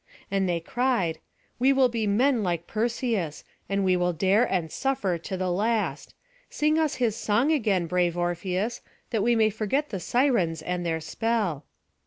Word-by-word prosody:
And 195 -2 +1
they 170 -1 0
cried: 190 -4 0 0.4
"We 260 +2 +4
will 265 -1 +4
be 230 -3 -2
men 240 +4 +3
like 175 -3 -1
Perseus, 225 - -2 0.3
and 195 0 0
we 185 -1 +3
will 180 0 +1
dare 195 +7 +3
and 170 -5 -1
suffer 205 -11 -1
to 190 +3 -5
the 185 -1 -1
last. 215 +4 -1 0.3
Sing 305 +1 +1
us 310 -2 +1
his 235 -4 0
song 230 +5 +1
again, 210 - +1
brave 175 0 0
Orpheus, 180 +6 -2 0.3
that 220 - +1
we 235 +3 +3
may 220 -1 +3
forget 230 +8 -1
the 195 - -4
Sirens 180 - +1
and 180 +1 -2
their 165 -1 -1
spell." 200 - -1
200 Hz, 170 wpm, -26 LUFS, 175-240 Hz, 0.4 s, We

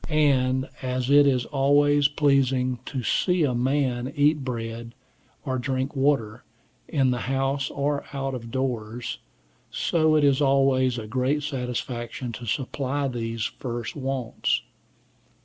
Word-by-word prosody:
And 130 -4 +2
as 130 0 -1
it 145 0 +7
is 125 -3 +2
always 145 +1 +3
pleasing 135 -4 +2
to 130 -3 -3
see 180 - +2
a 135 -4 +1
man 130 0 0
eat 145 0 +3
bread, 115 -1 -5 0.5
or 130 -2 -1
drink 130 +2 -2
water, 135 -5 +1 0.4
in 135 -5 +2
the 125 - -1
house 135 +1 0
or 140 0 -1
out 135 -1 -3
of 115 -2 -6
doors, 120 -2 -3 0.5
so 155 -2 +2
it 150 - +3
is 140 -1 +3
always 135 -2 +3
a 110 - -5
great 130 +6 0
satisfaction 125 -3 -4
to 115 +2 -8
supply 135 +3 -1
these 115 -2 -3
first 120 -2 -4
wants. 135 -4 -1
130 Hz, 130 wpm, -25 LUFS, 125-140 Hz, 0.5 s, it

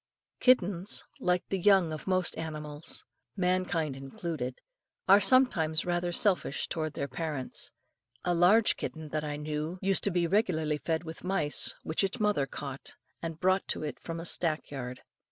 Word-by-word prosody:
Kittens, 195 -7 +3 0.2
like 180 0 +1
the 195 - -1
young 190 -4 +4
of 155 - -7
most 185 -1 +1
animals 150 -1 -6 0.3
mankind 180 -5 0
included 135 -1 -5 0.5
are 200 +2 +7
sometimes 190 -9 +4
rather 175 0 0
selfish 180 -6 +1
towards 155 -2 -3
their 140 - -2
parents. 140 -1 -3 0.6
A 175 - +2
large 190 +6 +5
kitten 160 -1 -5
that 155 0 -2
I 150 -1 -3
knew, 150 +3 -3
used 195 0 +2
to - - +4
be 175 -2 +1
regularly 160 -6 +1
fed 160 +1 -1
with 160 -1 -8
mice 180 -6 0
which 160 +5 0
its 195 +5 -1
mother 210 -10 +2
caught 140 0 -7 0.3
and 165 -1 -5
brought 185 +1 +2
to - - -1
it 150 -4 -5
from 165 0 -6
a 165 - -6
stack 160 -3 0
yard. 125 -3 -6
165 Hz, 160 wpm, -30 LUFS, 150-185 Hz, 0.6 s, are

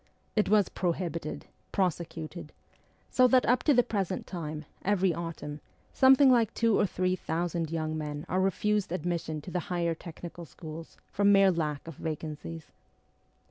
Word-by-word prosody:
It 210 -2 +2
was 210 -1 +5
prohibited, 170 -3 -3 0.3
prosecuted; 170 -3 -2 0.6
so 255 -1 +5
that 255 0 +4
up 250 +1 +3
to 295 - +5
the 245 - +6
present 195 -5 -2
time, 155 -4 -5 0.2
every 190 -2 +2
autumn, 155 -3 -6 0.3
something 265 0 +7
like 230 -4 +4
two 230 -2 +3
or - - +3
three 185 0 0
thousand 170 -1 -2
young 155 -1 -2
men 150 -1 -4
are 185 +2 +1
refused 205 0 +1
admission 170 -3 -2
to 165 - -9
the 180 - 0
higher 170 -2 0
technical 170 +1 -9
schools 160 +4 -10
from 205 0 +4
mere 195 -1 +6
lack 155 -3 -2
of 165 - -8
vacancies. 150 - -6
170 Hz, 150 wpm, -29 LUFS, 155-195 Hz, 0.6 s, something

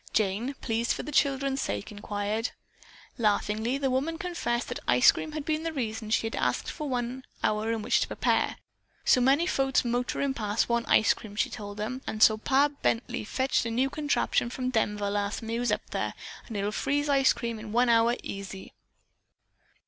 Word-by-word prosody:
Jane, 220 +6 0
pleased 230 0 0
for - - -5
the 300 - -6
children's 275 -1 +1
sake, 100 0 -3
inquired. 205 +2 -2 0.7
Laughingly 220 +3 +1
the 275 -2 0
woman 290 +6 0
confessed 325 -9 -2
that - - -4
the - - -1
ice - - +7
cream 310 - -6
had 305 -2 -4
been 310 0 0
the 330 0 -2
reason 225 -6 -3
she 225 - +2
had 225 - -3
asked - - -1
for 300 -3 -5
one 250 +1 -2 0.2
hour 215 +1 +1
in 225 -2 -2
which - - +3
to - - 0
prepare. - - +1 0.5
"So 250 - +5
many 275 +6 +4
folks 270 -7 +1
motorin' 245 +3 0
past 210 -3 0
want 235 0 0
ice 220 - +5
cream," 205 -2 -11
she - - 0
told 205 -2 -7
them, 240 +5 -3
"and 215 - +1
so 215 - +6
Pa 275 +5 +3
Bently 230 -1 0
fetched 260 +3 +1
a 230 - -2
new 255 +4 +1
contraption 290 -5 0
from 255 +1 -3
Denver 210 -3 0
last 205 +2 -1
time 225 - -7
he 230 +1 -1
was 245 - 0
up - - -1
there, - - -2 0.3
an' 225 - -6
it'll 200 +1 -1
freeze 285 +6 0
ice 275 -2 +4
cream 235 -2 -3
in 215 -1 -8
one 245 +3 +3
hour 230 0 +4
easy." 195 -1 -7
235 Hz, 195 wpm, -28 LUFS, 215-270 Hz, 0.7 s, ice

